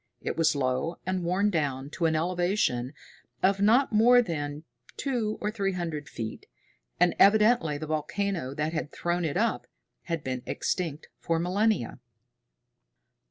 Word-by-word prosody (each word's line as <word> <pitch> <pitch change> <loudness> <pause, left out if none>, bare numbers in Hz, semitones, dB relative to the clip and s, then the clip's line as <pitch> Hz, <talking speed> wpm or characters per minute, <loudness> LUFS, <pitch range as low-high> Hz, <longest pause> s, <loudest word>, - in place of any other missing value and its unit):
It - - -3
was 165 -2 +2
low 135 +5 -1
and 185 -1 -1
worn 190 +4 +1
down 140 -4 -2
to 170 -1 0
an 160 - +1
elevation 175 -6 0 0.5
of 195 +1 +3
not 230 +5 +4
more 240 +3 +6
than 150 -5 -4 0.3
two 235 -6 -1
or 210 - -2
three 200 -3 -1
hundred 165 -5 -4
feet, 110 -1 -6 0.5
and 175 0 +4
evidently 210 -6 +5
the 155 - -5
volcano 155 -1 -2
that 155 +2 -2
had 155 -2 -3
thrown 175 0 -1
it 160 +1 -1
up 225 +2 0 0.4
had 165 -4 -3
been 130 -1 -3
extinct 160 -5 -3
for 165 - 0
millennia. 180 - 0
170 Hz, 145 wpm, -28 LUFS, 150-200 Hz, 0.5 s, more